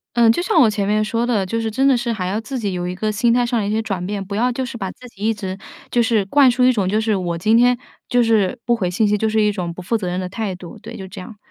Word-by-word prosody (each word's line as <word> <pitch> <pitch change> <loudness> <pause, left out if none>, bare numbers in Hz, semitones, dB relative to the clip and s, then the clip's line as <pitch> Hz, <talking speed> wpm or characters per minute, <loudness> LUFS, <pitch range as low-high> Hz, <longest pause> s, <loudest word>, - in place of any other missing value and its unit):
嗯， 235 -1 +5
就 230 - +3
像 365 -3 +2
我 235 - +6
前 205 -1 -1
面 210 +1 +2
说 230 +2 -1
的， 220 -6 +1
就 230 +5 -2
是 225 -1 -2
真 265 +5 +2
的 270 - +5
是 240 0 -1
还 190 -5 -3
要 200 +4 -1
自 255 +4 -5
己 205 -4 -2
有 175 -1 -3
一 180 - -3
个 215 +4 -2
心 230 +3 +2
态 245 0 +2
上 240 -2 0
的 - - -2
一 - - -1
些 220 +1 +1
转 195 -5 -3
变。 200 +1 -3
不 200 +1 -6
要 245 +4 +1
就 260 +2 -3
是 235 - -7
把 195 -4 -4
自 250 - -14
己 210 -4 -17
一 225 +1 +2
直 190 -3 -5 0.3
就 240 - +2
是 225 -3 +1
灌 270 +5 +5
输 250 +1 +2
一 255 - +6
种， 200 -5 0
就 210 +3 +1
是 220 -1 +1
我 175 -3 -2
今 215 +6 +2
天 245 +1 +4 0.3
就 245 - +3
是 225 -1 +2
不 240 - +3
回 185 -6 -2
信 215 +4 +2
息， 210 0 +2
就 220 +2 0
是 215 0 +2
一 210 -1 +2
种 175 -4 -4
不 185 - -9
负 225 +6 0
责 195 -4 -4
任 180 +1 -2
的 185 - -3
态 200 +1 -3
度。 180 +4 -10
对， 220 - -9
就 190 - -7
这 185 - -9
样。 210 +3 -11
215 Hz, 360 characters per minute, -20 LUFS, 195-235 Hz, 0.3 s, 我